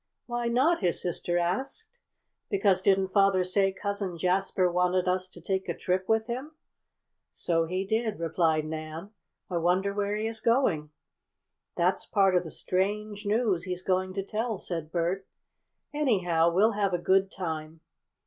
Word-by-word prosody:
"Why 240 -1 -2
not?" 265 +9 +3
his 180 -4 +1
sister 175 0 -1
asked. 190 - -1 0.6
"Because 195 -2 +3
didn't 190 -1 +3
father 195 -1 +3
say 195 +2 +2
Cousin 200 -2 -3
Jasper 185 +1 +1
wanted 180 +1 +1
us 185 0 +1
to 185 - -14
take 190 -1 -2
a - - -2
trip 185 +1 -1
with 220 0 +3
him?" 255 +6 -5 0.8
"So 165 -1 0
he 185 +3 -2
did," 220 0 -1
replied 160 -1 +1
Nan. 155 +4 -6 0.4
"I 180 - -2
wonder 180 +4 +1
where 205 0 -1
he 215 +1 -2
is 225 0 -2
going." 215 - +2 0.9
"That's - - +1
part 195 -3 +3
of 180 - +3
the 165 - -7
strange 205 +4 -2
news 205 -5 +1
he's 180 -1 -4
going 185 0 0
to 195 - -1
tell," 220 +2 -2
said 165 -4 -4
Bert. 180 +3 -1 0.7
"Anyhow 185 - +2
we'll 205 +6 +4
have 200 -3 0
a - - +1
good 190 +2 +2
time." 160 -3 -5
190 Hz, 160 wpm, -28 LUFS, 175-210 Hz, 0.9 s, we'll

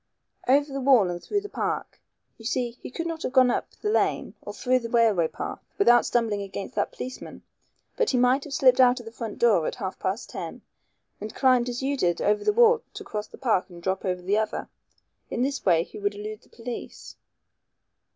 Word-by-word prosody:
"Over 280 +2 +3
the 275 - -3
wall 250 -9 +5
and 175 0 -5
through 410 -1 -1
the 410 - -7
park. - - -3 0.4
You 225 - -12
see, 245 0 -1
he - - -7
could 330 +6 -5
not 330 -1 -4
have - - -2
gone 255 -2 +6
up - - -2
the 420 - -4
lane - - +1
or - - -7
through 255 0 +1
the 230 -1 -6
railway 225 -8 +3
path - - -6
without 240 -12 +5
stumbling 225 -4 0
against 200 +4 -6
that - - -1
policeman. 255 0 -8 0.5
But 475 - +2
he 255 - +1
might 250 +3 +3
have 295 - -7
slipped 255 -2 +5
out 250 0 +5
of 240 - -11
the 225 - -8
front 225 -2 -6
door 215 -9 +3
at - - -3
half 190 -5 -5
past 195 +6 -3
ten - - -7 0.6
and 215 +1 -7
climbed 255 -2 +3
as 245 +2 -4
you 280 +1 0
did 175 -10 +1
over 210 0 +1
the - - +3
wall 465 +1 +5
to - - -6
cross 210 0 -5
the - - -13
park 220 -9 +1
and 175 -1 -11
drop 190 +2 -2
over 180 -2 -2
the 200 +4 +2
other. 220 -1 -3 0.6
In 240 - -1
this 275 +1 -2
way 170 -4 +4
he - - -11
would 205 0 -1
elude 210 +1 -7
the - - -25
police." 235 +1 -8
240 Hz, 220 wpm, -26 LUFS, 205-265 Hz, 0.6 s, gone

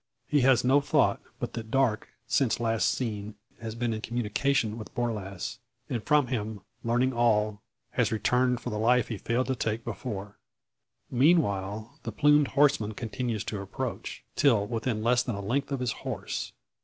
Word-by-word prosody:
He 145 -2 +3
has 130 -1 +5
no 135 +3 +5
thought - - +2 0.2
but - - -4
that 110 -1 -6
Darke, 130 -4 +1 0.2
since 130 -6 +1
last 115 -1 +2
seen, 105 -4 -3 0.2
has 115 -1 -5
been 120 -1 -1
in 110 - -4
communication 115 0 0
with 110 - -10
Borlasse; 105 -6 -3 0.3
and 120 - -1
from 150 +1 +4
him 110 -4 -3 0.2
learning 120 +3 +2
all, 105 -3 +2 0.3
has, - - +1
returned 125 +2 +2
for - - -4
the 105 - -2
life 120 +1 +3
he 110 -4 -4
failed 120 +2 0
to 130 - -1
take 115 -1 -2
before. 100 -5 -5 0.7
Meanwhile 110 - +2
the - - -5
plumed 150 -1 +4
horseman 135 -8 +2
continues 120 -2 -3
to 105 -3 -4
approach, 100 0 -5
till 115 -8 +4
within 115 0 -2
less 120 +1 +4
than 120 - -3
a - - -5
length 130 +8 -1
of 135 -2 -1
his 125 -2 0
horse. - - -4
115 Hz, 170 wpm, -28 LUFS, 110-130 Hz, 0.7 s, has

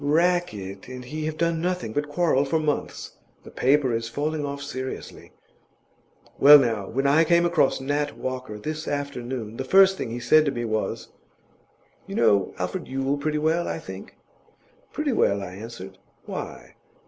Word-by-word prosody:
'Rackett 145 - 0
and 125 0 -8
he 155 +4 -5
have 155 0 -3
done 165 -1 0
nothing 180 -10 -2
but 145 +3 -2
quarrel 145 -3 +2
for 145 +3 0
months; 155 -2 -3 0.3
the - - -12
paper 135 -1 +2
is 115 0 -2
falling 150 +4 -2
off 140 0 -4
seriously. 130 -2 -7 1.1
Well, 145 +2 +10
now, 115 -7 0
when 135 +4 -1
I 145 +4 +5
came 170 +1 +3
across 170 -5 +2
Nat 145 +2 -2
Walker 130 -4 -5
this 155 +7 -5
afternoon, 125 -5 -4
the 130 - -2
first 190 +6 +5
thing - - -3
he 120 +2 -4
said 155 +6 +5
to 140 - +1
me 120 -2 -3
was, 110 -1 -3 1.0
"You - - -6
know 100 -2 +2
Alfred 90 0 -4
Yule 135 +2 -1
pretty 150 +1 -1
well, 160 +3 +1
I - - -2
think?" - - -10 0.7
"Pretty 300 -3 -1
well," 100 - +2
I 90 - -7
answered; 95 -2 -9 0.3
"why?" - - -7
140 Hz, 165 wpm, -25 LUFS, 120-155 Hz, 1.1 s, Well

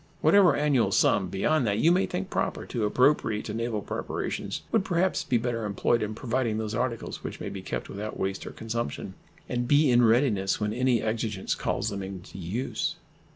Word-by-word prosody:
Whatever 180 +3 +6
annual 145 -5 +2
sum - - +3
beyond 135 +6 +1
that 100 0 +1
you 160 +9 +4
may 185 +2 +3
think 185 +1 -4
proper - - -1
to 115 -4 -2
appropriate 115 -2 +2
to 105 - -4
naval 115 -2 -2
preparations - - -4
would 220 -4 +3
perhaps 185 0 +1
be 125 - +1
better 115 -1 -2
employed 105 +3 +1
in 110 0 -3
providing 120 -2 -1
those 110 -1 -3
articles 115 0 -3
which - - -6
may - - -4
be - - -6
kept - - -4
without 105 +2 -6
waste 95 0 -2
or - - -6
consumption, 115 -8 -4 0.3
and 120 0 -2
be 145 0 +5
in 120 0 +5
readiness 110 -4 +3
when 105 0 -1
any 125 0 +2
exigence 110 -3 -1
calls 110 - -1
them 100 -2 -4
into 95 -1 -8
use. 100 +9 -2
115 Hz, 190 wpm, -27 LUFS, 105-130 Hz, 0.3 s, Whatever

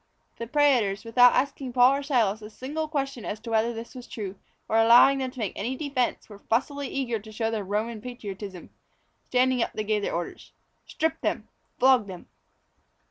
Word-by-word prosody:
The 230 - -4
prætors, 245 -8 +2
without 245 +2 +6
asking 265 -1 -1
Paul 250 +1 +6
or - - -4
Silas 230 -7 +1
a 210 - -9
single 290 +8 -4
question 275 -6 -3
as 210 - -4
to 230 0 -7
whether 225 +1 +2
this 230 0 -8
was 250 -2 -10
true, 200 -4 -6 0.3
or 220 - +1
allowing 240 +4 +7
them 260 -1 -2
to 255 - -16
make 215 -6 -2
any 240 +6 -3
defence, 265 -3 -2
were 205 -2 -13
fussily 280 +4 0
eager 245 -5 -2
to 215 +1 -13
show 225 +1 -2
their 215 -2 -2
Roman 215 +3 -3
patriotism. 205 -6 -8 0.6
Standing 255 0 +2
up - - -1
they 215 - -3
gave 210 0 0
their 200 - -2
orders: 170 0 -6 0.3
"Strip 320 0 -2
them, - - -2 0.3
flog 255 -4 +4
them." 185 -2 -9
235 Hz, 190 wpm, -26 LUFS, 215-260 Hz, 0.6 s, allowing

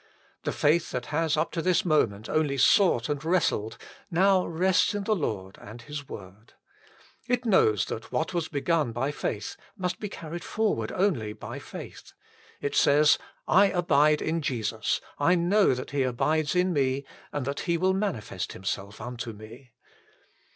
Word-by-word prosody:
The - - 0
faith 155 +3 +2
that 125 -1 -4
has 160 0 +1
up 155 +2 0
to 165 - -2
this 185 +1 +2
moment 110 - +1
only 150 -3 0
sought 130 - +4
and 145 -1 -3
wrestled, 160 - 0 0.3
now 190 +1 +3
rests 185 +4 +2
in 205 - -2
the 215 +1 +1
Lord 100 - -4
and 115 +3 -11
His 150 0 -7
word. 100 +3 -11 0.7
It 245 0 0
knows 110 - +3
that 110 - -6
what 160 +3 -1
was 170 -2 -1
begun 150 -3 0
~by 130 +5 -1
faith 105 -7 -4 0.2
must 180 -1 -2
be 210 - -4
carried 170 -1 -7
forward 210 - -1
only 130 - 0
by - - -8
faith. - - -10 0.5
It 145 - -2
says: 150 +1 +5 0.2
" - - -37
I 200 +2 +6
abide 155 -5 +3
in 165 +1 -1
Jesus; 115 -5 -1 0.2
I 165 +5 +4
know 180 -2 +3
that 125 - -6
He 140 -1 0
abides 150 +6 0
in 180 0 +2
me 135 -1 0 0.3
and 145 -3 -3
that 140 +1 -3
He 170 - +3
will 185 +2 +2
manifest 140 - -3
Himself 95 +2 -5
unto 120 0 -6
me." 110 +5 -13
150 Hz, 165 wpm, -27 LUFS, 120-175 Hz, 0.7 s, I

